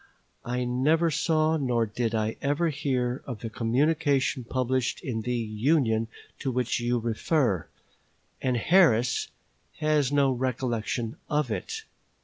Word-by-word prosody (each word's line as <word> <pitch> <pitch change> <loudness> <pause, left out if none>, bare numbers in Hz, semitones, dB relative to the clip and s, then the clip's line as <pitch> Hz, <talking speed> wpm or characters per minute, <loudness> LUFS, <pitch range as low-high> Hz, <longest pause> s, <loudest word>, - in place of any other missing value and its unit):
I 125 +1 -1
never 150 +7 +2
saw 155 +1 +2
nor 125 -5 +1
did 115 +1 -2
I 110 0 0
ever 145 +4 +1
hear 130 -3 -1
of 120 -5 -6
the 115 - -5
communication 135 +3 +1
published 130 0 -1
in 115 -4 -2
the 125 +2 -2
"Union" 115 +1 +1 0.3
to 135 - -2
which 125 -1 0
you 120 +1 0
refer, 115 - 0 0.7
and 125 -2 +1
Harris 125 -6 +3 0.5
has 150 -3 +2
no 140 -2 +3
recollection 120 -2 -2
of 150 -5 0
it. 445 - -4
125 Hz, 125 wpm, -27 LUFS, 115-145 Hz, 0.7 s, Harris